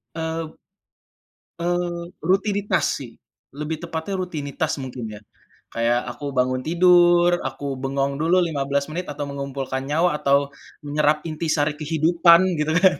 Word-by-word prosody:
Eee 160 -1 -4 1.0
Eee, 175 0 -2
rutinitas 195 +1 +1 0.2
sih, 120 -4 -10 0.3
lebih 150 +2 -5
tepatnya 165 +2 -4
rutinitas, 155 -3 -3
mungkin 130 -3 -6
ya. - - -15 0.5
Kayak 115 +1 +2
aku 140 +4 -6
bangun 130 0 +1
tidur, 175 +2 +4
aku 135 +1 -4
bengong 135 +1 -1
dulu 170 +3 +3
15 140 -4 0
menit, 170 +3 -5
atau 145 0 -4
mengumpulkan 140 -1 -4
nyawa, 160 +1 +1
atau 140 0 +2 0.3
menyerap 150 +1 +1
inti 160 0 -3
sari 150 -1 +1
kehidupan, 165 +3 +4 0.2
gitu 155 +1 0
kan, 185 0 +4
155 Hz, 130 wpm, -23 LUFS, 140-175 Hz, 1.0 s, tidur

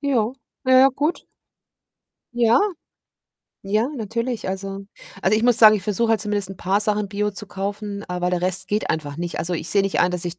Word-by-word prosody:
ja. 250 -5 0 0.3
Na 260 - +2
ja, 265 - +7
gut. 305 +6 -2 1.1
Ja 235 -1 +4 1.0
ja, 215 +5 0
natürlich. 230 0 -3
Also 195 +1 -5 0.3
Also, 195 +3 +2
ich 220 - -1
muss 245 -1 +5
sagen, 215 -1 +9
ich 205 - -2
versuche 225 +2 0
halt 225 -2 +3
zumindest 205 -2 0
'n 195 - -9
paar 190 +3 0
Sachen 210 -1 0
Bio 210 +1 -2
zu 200 - -6
kaufen, 200 +1 -5
aber 180 0 -1
der 180 -1 0
Rest 185 0 -1
geht 210 +1 -1
einfach 145 -2 -3
nicht. 175 +1 -4
Also, 170 +2 -2
ich 170 -1 -3
sehe 200 -1 +3
nicht 195 - -1
ein, 180 0 +3
dass 180 -1 -2
ich 175 0 -5
205 Hz, 200 wpm, -22 LUFS, 185-220 Hz, 1.1 s, sagen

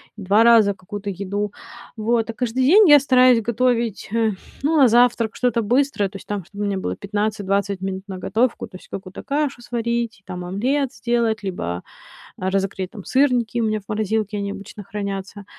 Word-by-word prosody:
2 205 +1 +3
раза 225 -3 +6
какую-то 200 +2 -7
еду. 200 +2 -3 0.5
Вот, 225 +1 0
а - - -3
каждый 250 +2 -1
день 395 +8 +7
я 295 -2 +9
стараюсь 255 -3 +5
готовить, 235 -1 0
э, 225 -1 +2 0.3
ну, 310 +3 +2
на 275 -3 +7
завтрак 235 -1 +3
что-то 245 -2 +1
быстрое, 245 -2 +1
то 200 - -18
есть, - - -14
там, 205 -4 -4
чтобы 205 +3 -6
у - - 0
меня 200 -1 -1
было 190 - -3
15-20 200 -1 -1
минут 190 0 -4
на 190 -2 -6
готовку, 225 +6 0
то 185 - -11
есть - - -18
какую-то 190 0 -8
кашу 285 -3 -1
сварить, 235 -2 -2
там, 180 0 -6
омлет 255 +9 -1
сделать, 235 -4 0
либо, 90 - -4 0.5
а, 185 - -2
разогреть 195 -1 -2
там 205 -5 -10
сырники, 250 -4 +2
у - - +1
меня 215 0 0
в - - -20
морозилке 215 -1 -1
они 200 0 -3
обычно 200 +1 -9
хранятся. 200 0 -5
215 Hz, 185 wpm, -21 LUFS, 200-240 Hz, 0.5 s, я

